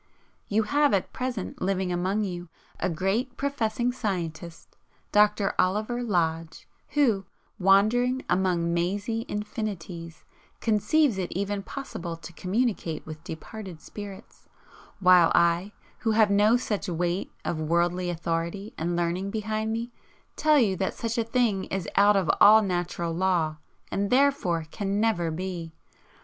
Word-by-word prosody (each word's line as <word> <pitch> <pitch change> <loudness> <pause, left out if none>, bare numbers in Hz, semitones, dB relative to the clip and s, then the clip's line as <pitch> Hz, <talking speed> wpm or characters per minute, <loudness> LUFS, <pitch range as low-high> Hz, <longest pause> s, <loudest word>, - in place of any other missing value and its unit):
You 220 +2 +2
have 285 +3 +3
at 190 - -2
present 250 -6 -4
living 185 -1 0
among 190 +4 0
you 175 -3 -5 0.3
a - - 0
great 200 +9 -1
professing 245 -3 0
scientist, 170 -8 -5 0.4
Dr. 210 -1 +3
Oliver 215 +6 +1
Lodge, 165 -7 -1 0.3
who, 225 -10 +2 0.3
wandering 220 +7 +3
among 175 -2 +1
mazy 205 +7 -1
infinities, 195 -6 -5 0.3
conceives 230 +2 +2
it 180 - -3
even 200 +2 -2
possible 185 -8 -6
to 170 +1 -11
communicate 190 -4 -1
with 155 0 -9
departed 180 +2 -8
spirits, 205 +3 -10 0.5
while 180 -3 +6
I, 170 +3 +3 0.3
who 225 -2 +1
have 215 -2 +4
no 210 +4 +5
such 210 -5 -3
weight 175 +2 -1
of 165 - -2
worldly 175 +3 +1
authority 170 +4 -3
and 170 +2 -1
learning 175 +3 -1
behind 215 +1 -2
me, 230 +2 -3 0.4
tell 305 -1 +4
you 215 -8 +3
that 190 - -1
such 230 0 -2
a - - +2
thing 225 -4 +1
is 190 -4 -4
out 205 +1 +6
of 190 -4 +1
all 215 +1 +8
natural 175 -2 -2
law 170 -3 +1 0.3
and 200 0 -1
therefore 255 - +2
CAN 200 -1 -2
NEVER 210 -7 +1
BE. 170 0 -4
195 Hz, 135 wpm, -27 LUFS, 175-220 Hz, 0.5 s, all